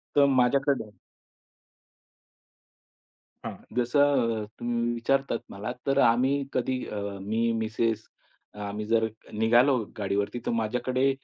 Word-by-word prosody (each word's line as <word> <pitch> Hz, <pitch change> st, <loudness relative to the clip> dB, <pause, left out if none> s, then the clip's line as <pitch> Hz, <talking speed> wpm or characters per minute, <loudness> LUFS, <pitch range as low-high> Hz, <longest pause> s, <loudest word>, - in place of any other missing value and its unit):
तर 145 Hz, -1 st, +6 dB
माझ्याकडे 135 Hz, -1 st, +2 dB, 2.6 s
हां, -, -, -4 dB, 0.2 s
जसं 125 Hz, -3 st, +2 dB
अ, -, -, -6 dB
तुम्ही 120 Hz, 0 st, 0 dB
विचारतात 135 Hz, +1 st, 0 dB
मला 100 Hz, +2 st, -5 dB, 0.2 s
तर 135 Hz, -, +2 dB
आम्ही 130 Hz, +4 st, +3 dB
कधी 130 Hz, +1 st, 0 dB
अ, 105 Hz, -, -5 dB, 0.2 s
मी 110 Hz, +4 st, 0 dB
मिसेस 110 Hz, 0 st, -1 dB, 0.5 s
अ, 105 Hz, -, -12 dB
आम्ही 105 Hz, +1 st, -4 dB
जर 110 Hz, +1 st, +2 dB, 0.3 s
निघालो 120 Hz, +4 st, +5 dB, 0.2 s
गाडीवरती, 100 Hz, +3 st, -1 dB
तर -, -, 0 dB
माझ्याकडे 125 Hz, +4 st, +1 dB
120 Hz, 110 wpm, -27 LUFS, 110-130 Hz, 2.6 s, तर